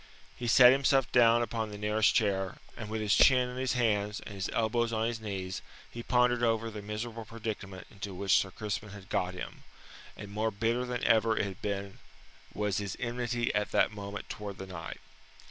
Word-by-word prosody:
He 120 - -5
sat 125 +1 +8
himself 135 -1 +3
down 120 -1 +5
upon 115 -2 -3
the 105 - -7
nearest 105 +1 +2
chair, 95 -3 +1 0.2
and 110 -2 -7
with 110 0 -2
his 105 -1 +2
chin 125 -2 +6
in 125 - -7
his 130 0 0
hands 105 -4 +1
and 105 - -9
his 95 -2 -3
elbows 115 +1 +1
on 110 0 0
his 115 -1 -3
knees 95 -3 -4 0.3
he 120 - -6
pondered 125 0 +2
over 115 -1 +1
the 105 -1 -7
miserable 110 +2 -5
predicament 105 -4 -6
into 100 -2 -7
which 95 -1 +1
Sir 95 - +2
Crispin 105 +2 -4
had 95 -1 -11
got 90 0 -1
him, 90 - -8 0.5
and 100 - -8
more 110 +2 0
bitter 115 +4 0
than 125 -1 -4
ever 110 -1 +3
it - - +1
had 95 -1 -7
been 100 -1 -4 0.5
was 105 -1 -1
his 100 -2 -3
enmity 120 0 -1
at 105 0 0
that - - +3
moment 100 -1 -7
towards 100 -2 -6
the 95 - -6
knight. 90 -3 -7
110 Hz, 195 wpm, -30 LUFS, 100-120 Hz, 0.5 s, sat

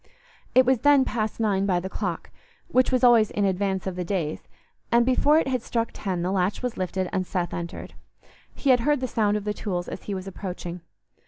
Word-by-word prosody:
It 255 0 +7
was 260 -1 +3
then 285 0 +5
past 215 -2 -2
nine 200 -3 +1
by 180 -2 +2
the 180 - -5
clock, 185 -3 -4 0.4
which 255 -5 +3
was 255 0 +1
always 235 -3 +6
in 205 - 0
advance 190 0 -1
of 190 -2 -3
the 180 - -3
days, 170 -4 -3 0.4
and 235 0 +4
before 285 +4 +4
it 320 - +2
had 255 -2 0
struck 230 0 -1
ten 185 -4 -3
the 180 - -1
latch 190 +4 0
was 250 -2 -2
lifted 185 0 -2
and 185 - +1
Seth 180 -1 -3
entered. 170 +1 -6 0.6
He 275 - +2
had 250 - +5
heard 290 +4 +2
the 255 - -2
sound 210 -3 +1
of 210 - -5
the 210 0 -2
tools 180 -5 -3
as - - -7
he 200 - -3
was 185 0 -6
approaching. 180 -2 -6
205 Hz, 220 wpm, -25 LUFS, 185-245 Hz, 0.6 s, It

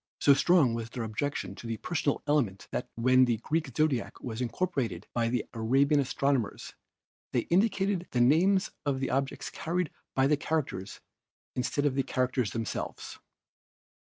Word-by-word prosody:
"So 140 - +6
strong 150 -4 +4
was 115 -1 -4
their 120 0 -4
objection 115 +6 -3
to 120 - -9
the 115 -1 -3
personal 145 - -1
element 135 -10 0
that - - -3
when 130 +2 +5
the 120 -2 +1
Greek 150 +6 -1
Zodiac 155 -6 0
was 115 -1 -5
incorporated 125 - -2
by 115 -1 +1
the 120 -1 -1
Arabian 135 +6 +3
astronomers 135 -3 -1 0.6
they 120 - +3
indicated 195 -1 +2
the 125 - -1
names 170 +10 +4
of 140 -3 0
the 135 - -2
objects 135 +1 -2
carried 175 0 -2 0.2
by 135 - +4
the 150 +1 +3
characters 130 -12 -3 0.5
instead 135 +3 0
of 145 - +2
the 135 - +1
characters 130 -3 0
themselves. 115 -3 -5
135 Hz, 155 wpm, -29 LUFS, 115-150 Hz, 0.6 s, So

